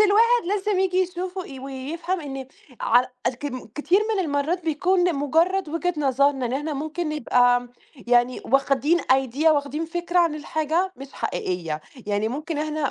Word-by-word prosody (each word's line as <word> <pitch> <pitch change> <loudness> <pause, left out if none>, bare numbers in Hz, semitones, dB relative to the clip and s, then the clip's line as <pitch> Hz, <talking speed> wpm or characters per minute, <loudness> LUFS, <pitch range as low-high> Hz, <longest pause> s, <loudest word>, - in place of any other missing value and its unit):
الواحد 455 +4 +5
لازم 410 -1 0
ييجي 370 -1 +1
يشوف 365 0 -3
و 375 - -1 0.2
ويفهم 315 +7 -4
إن 270 -3 -6 0.3
ع 245 +2 +4 0.2
الكم 255 0 -3
كتير 330 +7 +2
من 385 - 0
المَرّات 310 +4 -1
بيكون 355 +4 +2
لمجرّد 330 +4 +1
وجهة 345 +3 -1
نظرنا، 275 -2 +2
إن 235 - -4
إحنا 295 +4 -2
ممكن 315 +4 -3
نبقى 245 -4 +2 0.4
يعني 245 +1 +3
واخدين 275 +5 +2
idea، 265 +3 +1
واخدين 300 +1 +2
فكرة 345 +2 -1
عن 335 -3 +3
الحاجة 315 +4 -1
مش 275 0 -10
حقيقية، 165 -4 -3 0.3
يعني 205 +1 0
ممكن 300 +5 -4
إحنا 305 -2 -1
300 Hz, 150 wpm, -24 LUFS, 270-350 Hz, 0.4 s, الواحد